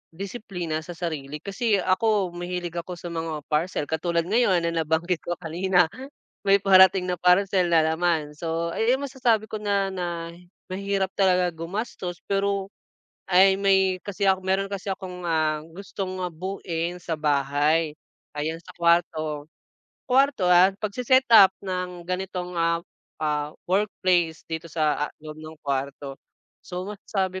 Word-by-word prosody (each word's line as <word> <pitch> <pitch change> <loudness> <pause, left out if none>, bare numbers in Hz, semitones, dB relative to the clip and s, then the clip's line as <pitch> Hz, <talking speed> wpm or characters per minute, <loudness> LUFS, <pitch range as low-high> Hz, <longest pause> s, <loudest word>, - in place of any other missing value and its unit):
disiplina 185 -5 -4
sa 170 +2 -9
sarili. 150 -4 -4
Kasi 210 +2 0
ako 195 0 +1
mahilig 175 0 -4
ako 180 +1 -6
sa 175 0 -8
mga 160 -3 -4
parcel 155 +1 0
katulad 170 +2 -1
ngayon 190 -3 +2
na 170 - 0
nabanggit 160 +3 0
ko 175 - -4
kanina 180 +2 +2 0.6
may 195 0 +6
parating 190 -1 +6
na 180 - -2
parcel 180 0 +3
na 165 -2 +4
naman. 160 -2 0
So 165 0 -2
ay 230 +8 +2
ay - - +1
masasabi 245 -6 0
ko 215 - -3
na 200 -2 0
na 170 -2 -4 0.4
mahirap 195 0 -1
talaga 180 -2 +3
gumastos 175 +1 -5
pero, 200 0 0 0.6
ay 190 +1 +6
may 190 -2 +3
kasi 200 0 -1
ako 190 0 +3
meron 195 +1 +1
kasi 200 +1 -5
akong, 180 -2 -7
ah, 155 -2 +1 0.2
gustong 195 -1 -5
buoin 175 -1 -4
sa 165 -1 -3
bahay, 150 +2 +1 0.4
ayan 160 +2 -2
sa 180 - -23
kuwarto, 160 -3 +1 0.6
kuwarto, 260 -7 +3
ah, 180 +2 +6
pagse-setup 230 -2 +5
ng 180 -2 -5
ganitong, 180 -1 -3
ah, 170 0 +1 0.4
ah, 150 -1 -1 0.2
workplace 185 -4 +1
dito 160 0 -4
sa, 150 -2 0
ah, - - -17
loob 155 0 -8
ng 155 0 -10
kuwarto 140 0 -3 0.5
so 180 0 -5
masasabi 190 -2 -3
180 Hz, 140 wpm, -25 LUFS, 165-195 Hz, 0.6 s, may